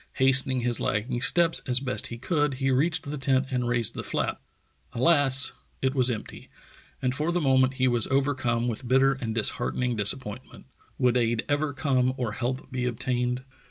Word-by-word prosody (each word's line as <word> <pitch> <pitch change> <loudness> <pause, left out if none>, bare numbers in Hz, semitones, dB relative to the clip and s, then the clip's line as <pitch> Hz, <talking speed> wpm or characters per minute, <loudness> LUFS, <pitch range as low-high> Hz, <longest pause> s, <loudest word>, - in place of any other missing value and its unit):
Hastening 130 -1 +3
his 120 -1 -1
lagging 120 +3 -2
steps 170 +4 +4
as 125 -1 +2
best 130 -1 -2
he 115 - -7
could, 145 +1 -1
he 135 0 0
reached 150 +6 +1
the 145 0 -6
tent 135 0 +1
and 125 -1 -1
raised 120 -2 0
the - - -5
flap. - - -3 0.5
Alas! 140 0 +5 0.3
it 130 0 0
was 130 -2 +2
empty, 110 -3 -6 0.5
and 125 -1 +1
for 150 +5 -1
the 175 - 0
moment 130 -3 +2
he 130 0 +1
was 120 -3 +2
overcome 130 -4 0
with 120 +2 -4
bitter 135 +2 +4
and 115 -4 -5
dis 115 - +3
heartening 125 -1 -1
disappointment. 110 +3 -3 0.3
Would 125 -2 +2
aid 115 -1 0
ever 145 0 0
come 130 -3 0
or 120 -4 -2
help 130 +5 -4
be 125 -1 -2
obtained? 125 +1 -2
130 Hz, 180 wpm, -26 LUFS, 120-135 Hz, 0.5 s, Alas